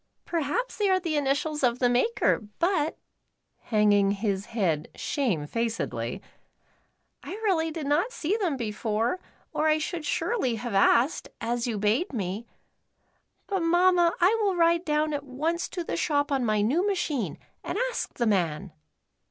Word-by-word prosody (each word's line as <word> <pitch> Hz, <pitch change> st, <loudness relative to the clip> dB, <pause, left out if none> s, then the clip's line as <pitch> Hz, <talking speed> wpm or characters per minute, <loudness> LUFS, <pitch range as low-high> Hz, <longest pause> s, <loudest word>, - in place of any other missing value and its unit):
Per 340 Hz, -, -1 dB
haps 395 Hz, -, -2 dB
they 410 Hz, -2 st, +2 dB
are 375 Hz, 0 st, +4 dB
the 335 Hz, -4 st, -2 dB
initials 295 Hz, +2 st, 0 dB
of 245 Hz, -2 st, +2 dB
the 250 Hz, -, +3 dB
maker, 250 Hz, -, +2 dB, 0.2 s
but 335 Hz, -3 st, +1 dB, 0.7 s
(hanging 205 Hz, -2 st, +3 dB
his 200 Hz, 0 st, -1 dB
head 175 Hz, -10 st, 0 dB
shamefacedly) 230 Hz, -, -2 dB, 1.0 s
I -, -, -7 dB
really 335 Hz, -6 st, +2 dB
did 315 Hz, -2 st, -5 dB
not 300 Hz, -, +1 dB
see 390 Hz, -4 st, -1 dB
them 360 Hz, -11 st, 0 dB
before, 225 Hz, -, -1 dB, 0.3 s
or 310 Hz, -, +1 dB
I 310 Hz, 0 st, +4 dB
should 325 Hz, +1 st, -3 dB
surely 300 Hz, -, 0 dB
have 240 Hz, 0 st, -5 dB
asked, 235 Hz, +8 st, +3 dB
as 235 Hz, +1 st, -1 dB
you 225 Hz, -3 st, -2 dB
bade 220 Hz, -, +1 dB
me. 205 Hz, +1 st, -3 dB, 1.0 s
But, 390 Hz, -2 st, -1 dB
Mamma, 350 Hz, 0 st, +4 dB
I 365 Hz, +5 st, +5 dB
will 395 Hz, -3 st, +2 dB
ride 340 Hz, 0 st, +3 dB
down 305 Hz, 0 st, +1 dB
at 285 Hz, -1 st, -2 dB
once 310 Hz, +6 st, -2 dB
to 355 Hz, -, -4 dB
the -, -, -3 dB
shop 290 Hz, -3 st, 0 dB
on 270 Hz, -2 st, +1 dB
my 215 Hz, -2 st, +2 dB
new 275 Hz, -, +2 dB
machine 340 Hz, -, -1 dB, 0.3 s
and -, -, -3 dB
ask -, -, -4 dB
the 240 Hz, -, 0 dB
man." 185 Hz, -3 st, 0 dB
285 Hz, 155 wpm, -27 LUFS, 225-340 Hz, 1.0 s, I